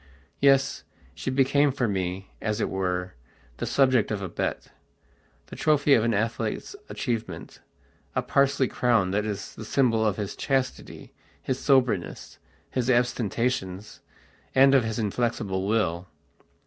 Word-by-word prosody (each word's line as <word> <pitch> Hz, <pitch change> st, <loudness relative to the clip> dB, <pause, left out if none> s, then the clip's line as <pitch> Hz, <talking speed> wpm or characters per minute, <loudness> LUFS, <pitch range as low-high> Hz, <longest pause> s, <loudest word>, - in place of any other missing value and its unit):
Yes, 135 Hz, -1 st, +3 dB, 0.3 s
she -, -, -4 dB
became 140 Hz, +2 st, +3 dB
for 125 Hz, -2 st, -1 dB
me, 95 Hz, -1 st, -3 dB
as 110 Hz, 0 st, -1 dB
it -, -, -1 dB
were, 90 Hz, -1 st, -2 dB, 0.4 s
the -, -, -3 dB
subject 130 Hz, -5 st, +3 dB
of 105 Hz, -, -2 dB
a 95 Hz, -, -4 dB
betthe -, -, -3 dB, 0.9 s
trophy 150 Hz, -2 st, +3 dB
of 115 Hz, -, +4 dB
an 115 Hz, -2 st, +1 dB
athlete's 115 Hz, -, -2 dB
achievement, 110 Hz, -9 st, -4 dB, 0.6 s
a -, -, +1 dB
parsley 140 Hz, -1 st, +2 dB
crown 115 Hz, -8 st, +1 dB
that 105 Hz, +2 st, 0 dB
is 100 Hz, -2 st, -5 dB
the -, -, -9 dB
symbol 115 Hz, -1 st, +2 dB
of 105 Hz, -3 st, +1 dB
his 105 Hz, -2 st, -4 dB
chastity, 135 Hz, -1 st, -3 dB, 0.3 s
his 130 Hz, 0 st, -3 dB
soberness, 125 Hz, -10 st, 0 dB, 0.3 s
his 130 Hz, -1 st, -1 dB
abstentions, 115 Hz, -4 st, -1 dB, 0.6 s
and 135 Hz, +1 st, +6 dB
of 135 Hz, -3 st, +5 dB
his 110 Hz, -1 st, -3 dB
inflexible 105 Hz, -3 st, -1 dB
will. 95 Hz, -5 st, 0 dB
115 Hz, 135 wpm, -26 LUFS, 100-130 Hz, 0.9 s, and